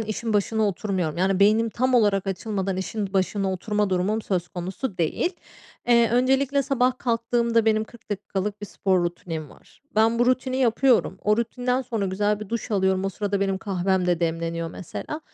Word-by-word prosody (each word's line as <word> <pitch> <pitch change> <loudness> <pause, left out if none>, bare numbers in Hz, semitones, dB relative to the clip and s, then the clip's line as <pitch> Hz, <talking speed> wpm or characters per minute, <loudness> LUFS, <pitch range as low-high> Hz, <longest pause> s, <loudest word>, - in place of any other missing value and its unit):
işin 220 +1 -3
başına 215 +1 +1
oturmuyorum. 185 -5 -2
Yani 190 +1 +1
beynim 220 +3 +4
tam 255 +3 0
olarak 205 -4 +3
açılmadan 195 0 -2
işin 195 +1 -3
başına 195 0 0
oturma 205 +2 -1
durumum 195 +5 0
söz 180 -4 -2
konusu 185 +4 -5
değil. 340 - 0 0.5
Eee, 235 -1 +5
öncelikle 270 +3 +2
sabah 255 -2 +1
kalktığımda 235 -1 +1
benim 220 -1 +2
40 230 -1 -18
dakikalık 205 +1 -3
bir 205 - -5
spor 185 -3 +1
rutinim 165 -3 -5
var. - - -20
Ben 225 +2 +3
bu 240 - +3
rutini 255 0 +1
yapıyorum. 240 -5 +2
O 210 0 +3
rutinden 250 +2 -1
sonra 225 -5 -2
güzel 205 +2 0
bir 215 - -7
duş 230 0 -4
alıyorum. 190 -1 +1
O - - +1
sırada 200 +1 -2
benim 195 -1 0
kahvem 190 -2 0
de 175 -1 +1
demleniyor 165 0 -2
mesela. 300 - -6
205 Hz, 170 wpm, -24 LUFS, 190-235 Hz, 0.5 s, Eee